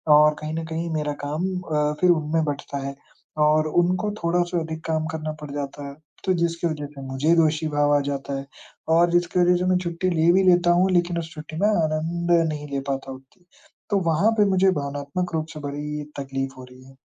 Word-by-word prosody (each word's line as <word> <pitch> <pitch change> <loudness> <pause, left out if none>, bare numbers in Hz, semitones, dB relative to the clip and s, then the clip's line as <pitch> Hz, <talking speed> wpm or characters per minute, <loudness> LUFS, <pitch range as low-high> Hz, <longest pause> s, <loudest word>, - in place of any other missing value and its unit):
और 150 0 +6
कहीं 155 0 -5
न 165 0 -3
कहीं 165 +1 -3
मेरा 150 -1 -1
काम 155 +5 -2
अ, 150 -3 0
फिर 180 - +5
उनमें 160 0 +1
बँटता 140 -1 -4
है। 140 - -6 0.5
और 155 +1 +3
उनको 180 +5 +1
थोड़ा-सा 175 +1 +1
अधिक 160 0 -5
काम 155 -1 0
करना 155 -1 -4
पड़ 150 - -7
जाता 140 0 -5
है, 140 - -9 0.3
तो 185 - +3
जिसकी 170 0 0
वजह 150 -2 -4
से 135 - -8
मुझे 150 +6 +2
दोषी 160 -1 +2
भाव 145 0 +2
आ - - +2
जाता 140 0 -3
है, 135 - -8 0.4
और 170 +1 +4
जिसकी 175 +1 +1
वजह 180 0 +5
से 180 - -1
मैं 180 - +4
छुट्टी 170 +2 -1
ले 165 +1 +4
भी 190 +1 +4
लेता 175 -1 +4
हूँ, 180 +2 +3
लेकिन 175 -1 +1
उस 160 -1 -6
छुट्टी 155 +1 -8
में 205 - +4
आनंद 170 -1 0 0.2
नहीं 150 -1 -5
ले 140 - -1
पाता 135 0 -4
उतनी। 135 +7 -17 0.5
तो 200 - +3
वहाँ 200 +8 +3
पे 205 - +5
मुझे 190 0 +4
भावनात्मक 145 +5 -4
रूप 155 0 -2
से 155 - -7
बड़ी 150 +1 -4 0.2
तक़लीफ़ 135 0 -3
हो 130 - -9
रही 125 0 -16
है। 135 0 -17
160 Hz, 215 wpm, -24 LUFS, 145-175 Hz, 0.5 s, और